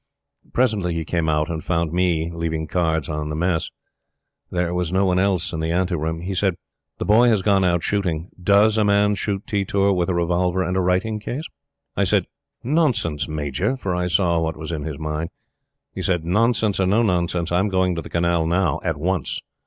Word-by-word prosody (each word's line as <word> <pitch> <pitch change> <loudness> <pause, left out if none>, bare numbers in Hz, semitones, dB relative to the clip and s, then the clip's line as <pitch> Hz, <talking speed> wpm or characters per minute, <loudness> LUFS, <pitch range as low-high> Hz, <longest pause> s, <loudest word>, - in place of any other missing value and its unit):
Presently 105 -9 +1
he 80 -1 -2
came 85 -1 0
out 75 0 +1
and 80 -2 -4
found 85 -2 -1
me 85 -2 +1
leaving 80 -1 -2
cards 80 -3 0
on 75 -1 -3
the 75 - -3
Mess. 85 0 0 0.8
There 90 -1 -1
was 90 -2 -1
no 95 +1 +2
one 90 -1 +2
else 95 -3 0
in 80 - -3
the 80 +1 -1
ante 90 +1 0
room. 80 0 -2
He 95 +3 -3
said: 95 -1 +1 0.4
"The - - -3
Boy 115 +4 +5
has 105 -5 +2
gone 100 -2 +3
out 85 -2 +2
shooting. 90 -4 -1
DOES 105 +3 +4
a - - +4
man 105 0 +3
shoot 100 0 -3
tetur 100 -2 +1
with 90 -1 0
a 90 - 0
revolver 90 +2 +1
and 90 +1 -2
a 95 - +2
writing 95 +5 0
case?" 125 +8 -5 0.5
I - - +2
said: - - +2 0.4
"Nonsense, 120 - +1
Major!" 75 - -2
for 95 -8 -3
I 90 0 -1
saw 85 -2 +2
what 80 -1 -2
was 80 +1 -6
in 75 -3 -4
his 75 -3 -5
mind. 75 +2 -3 0.6
He - - -5
said: 85 -3 0
"Nonsense 110 +2 +2
or 95 - +2
nonsense, 90 -5 +1
I'm 95 +4 +2
going 95 -1 +1
to 85 - -3
the - - -10
Canal 85 -1 +1
now 85 -3 +1
at 80 -4 -1
once. 85 0 -1
90 Hz, 200 wpm, -22 LUFS, 80-100 Hz, 0.8 s, Boy